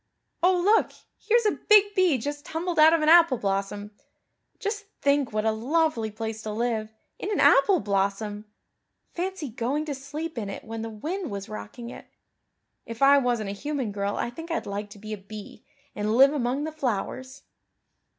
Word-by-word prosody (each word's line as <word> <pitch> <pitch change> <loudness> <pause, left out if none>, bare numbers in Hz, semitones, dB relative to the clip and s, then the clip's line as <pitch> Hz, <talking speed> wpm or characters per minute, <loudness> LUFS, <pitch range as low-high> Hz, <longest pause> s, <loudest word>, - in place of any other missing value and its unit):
Oh, 360 0 +4
look, 415 +5 +3 0.3
here's 470 0 +2
a 420 - +1
big 410 -1 +6
bee 365 -8 +3
just 290 +4 -5
tumbled 335 +1 -3
out 310 +1 +8
of 330 -2 +2
an - - +1
apple 330 -5 +7
blossom. 200 0 -2 0.7
Just 415 -1 -4
think 280 -2 +2
what 215 0 -1
a 220 - +3
lovely 245 0 0
place 220 +1 -5
to 215 - -6
live 220 0 -2 0.3
in 410 - -3
an - - 0
apple 390 -4 +5
blossom! 205 0 -1 0.7
Fancy 360 -4 -3
going 260 +6 -2
to 295 - -3
sleep 285 +2 -6
in 205 -3 -4
it 195 - -7
when 225 0 -6
the 225 - -4
wind 315 - -4
was 200 -2 -5
rocking 235 +3 -8
it. - - -11 0.8
If 230 +3 -4
I 280 +1 +7
wasn't 240 -6 -1
a - - -4
human 265 0 -3
girl 200 0 -2
I 240 - -2
think 325 +7 -9
I'd 330 - -2
like 205 +1 -5
to 205 - -12
be 215 +1 -7
a - - -4
bee 205 +1 -11 0.3
and 210 +2 -1
live 275 +2 +7
among 265 0 -1
the 315 - -3
flowers." 260 0 -4
255 Hz, 185 wpm, -26 LUFS, 215-320 Hz, 0.8 s, out